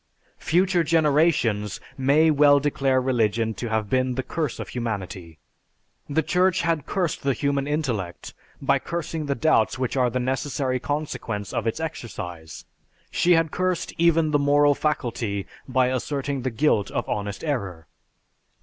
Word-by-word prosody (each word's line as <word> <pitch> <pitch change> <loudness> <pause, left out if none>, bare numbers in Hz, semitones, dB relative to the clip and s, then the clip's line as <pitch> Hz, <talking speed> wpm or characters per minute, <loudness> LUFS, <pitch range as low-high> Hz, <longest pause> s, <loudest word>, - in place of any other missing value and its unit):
Future 180 +1 +2
generations 150 - +2 0.2
may 145 +4 +4
well 145 -1 +5
declare 140 -2 +1
religion 115 -3 +1
to 120 +1 -5
have 110 -1 0
been 130 +2 +1
the 130 - -2
curse 150 +1 -3
of - - -6
humanity. 95 -8 -5 0.7
The 155 +3 +1
Church 180 +3 +2
had 165 -3 0
cursed 180 -5 -1
the 140 -1 +1
human 140 +3 -1
intellect 125 - -3 0.3
by - - +2
cursing 165 -2 -4
the 140 - 0
doubts 155 -9 +2
which 130 0 -2
are 125 -2 +3
the 125 - -2
necessary 130 0 -1
consequence 125 -8 -4
of - - -1
its 115 - -1
exercise. 90 - -6 0.5
She 175 - +3
had 165 -2 +2
cursed 185 -2 -1
even 165 -2 +3
the 145 - +3
moral 145 0 +4
faculty 120 -9 -2 0.2
by 130 -1 +2
asserting 135 +1 -2
the 130 - -1
guilt 115 -4 +1
of - - -3
honest 100 -1 -3
error. 100 - -3
135 Hz, 150 wpm, -24 LUFS, 115-155 Hz, 0.7 s, well